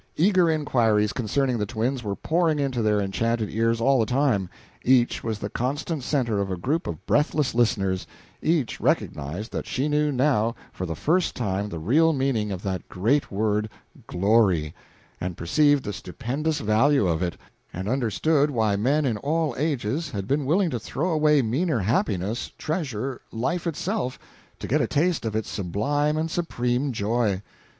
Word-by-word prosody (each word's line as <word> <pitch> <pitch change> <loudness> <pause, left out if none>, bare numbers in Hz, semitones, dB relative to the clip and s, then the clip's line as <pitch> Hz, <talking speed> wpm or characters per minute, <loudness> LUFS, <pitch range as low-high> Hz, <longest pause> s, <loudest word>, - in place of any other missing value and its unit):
Eager 180 0 +4
inquiries 115 -9 +2
concerning 125 +1 0
the 105 - 0
twins 120 +3 -2
were 100 -2 -2
pouring 165 - +1
into 135 -4 -1
their 105 -1 +2
enchanted 110 +2 -1
ears 115 +1 +1
all 135 +3 +3
the 110 - +3
time; 125 -8 +1 0.3
each 125 -1 +3
was 110 -2 -2
the 100 - -4
constant 140 +8 -2
center 120 -6 0
of 100 -1 -1
a 95 - -2
group 145 - -1
of - - -6
breathless 150 -2 +1
listeners; 100 -6 +1 0.3
each 155 -6 0
recognized 80 - -1
that - - -4
she 135 +3 -1
knew 150 0 +1
now 125 -4 +2 0.2
for 95 - -4
the 80 - -3
first 175 - +1
time 100 -3 -2
the 85 - -5
real 150 - +3
meaning 130 -7 0
of 95 -1 -5
that 95 -3 -4
great 115 +11 +1
word 105 +1 0 0.4
Glory, 95 -5 +2 0.5
and 90 -1 -4
perceived 145 - +3
the 105 - -3
stupendous 140 - -3
value 115 +5 +3
of 80 -2 0
it, 90 -2 -2 0.3
and 95 +3 -5
understood 140 +5 +1
why 110 -6 +1
men 140 +9 +1
in 115 -5 0
all 155 +3 0
ages 145 +1 -1
had 100 -2 -5
been 140 +2 0
willing 175 +3 +2
to 120 - -2
throw 160 +10 -2
away 150 -3 +4
meaner 140 +6 0
happinesses, 105 +1 -1
treasure, 135 - -3
life 135 +10 -2
itself, 170 - -2 0.4
to - - -6
get - - +2
a - - +1
taste 165 -1 +1
of 110 -1 -2
its 110 - -1
sublime 145 - 0
and 160 +1 -1
supreme 130 -5 -1
joy. 110 -2 0
120 Hz, 170 wpm, -25 LUFS, 105-150 Hz, 0.5 s, Eager